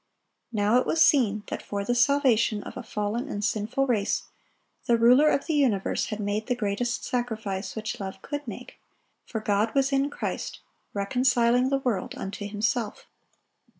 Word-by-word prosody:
Now 215 +2 +3
it - - -2
was 325 - +1
seen 225 -10 +4
that - - -4
for 200 -1 -4
the 245 - +1
salvation 245 -5 +3
of - - -9
a - - -5
fallen 220 +4 -3
and 205 -4 -2
sinful 225 +6 0
race, 220 -6 0 0.6
the 235 - +4
Ruler 250 +6 +6
of 280 - +1
the 325 - -1
universe 250 -10 +1
had 210 - -4
made 210 +1 -2
the 250 - +1
greatest 240 +2 -2
sacrifice 220 -6 -3
which 220 -1 -4
love 195 -1 -6
could 290 0 -5
make; - - -8 0.5
for 220 - -3
"God 215 +2 0
was 275 0 +3
in 275 +1 +2
Christ, - - -4 0.4
reconciling 245 +3 +2
the 275 - +2
world 245 -8 -2
unto 200 +1 -5
Himself." 215 +2 -2
230 Hz, 165 wpm, -26 LUFS, 205-255 Hz, 0.6 s, Ruler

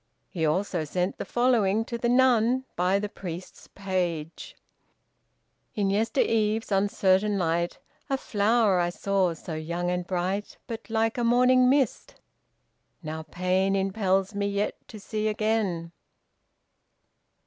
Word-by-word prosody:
He 160 -4 0
also 180 +1 0
sent 180 +5 -2
the - - -3
following 225 -4 +2
to 235 - -5
the 235 0 -1
nun, 250 0 +3
by 180 +2 +2
the 210 +1 -2
priest's 180 -3 -8
page: 175 -5 -3 1.2
"In 200 -3 +1
yester 220 +3 +1
eve's 220 0 0
uncertain 200 +1 +2
light, 170 -1 0 0.3
A 270 - +1
flower 210 -4 +2
I 175 0 +1
saw 185 -1 0
so 160 - -8
young 170 +3 -2
and 180 0 -2
bright, 190 +3 -2
But 230 -2 -7
like 225 +1 0
a - - 0
morning 250 +2 +4
mist. 270 -1 0 0.9
Now 160 0 -5
pain 185 +4 0
Impels 195 0 0
me 200 0 -1
yet 200 +1 -1
to 215 - -10
see 215 +1 -3
again." 210 -6 -1
200 Hz, 130 wpm, -26 LUFS, 180-225 Hz, 1.2 s, morning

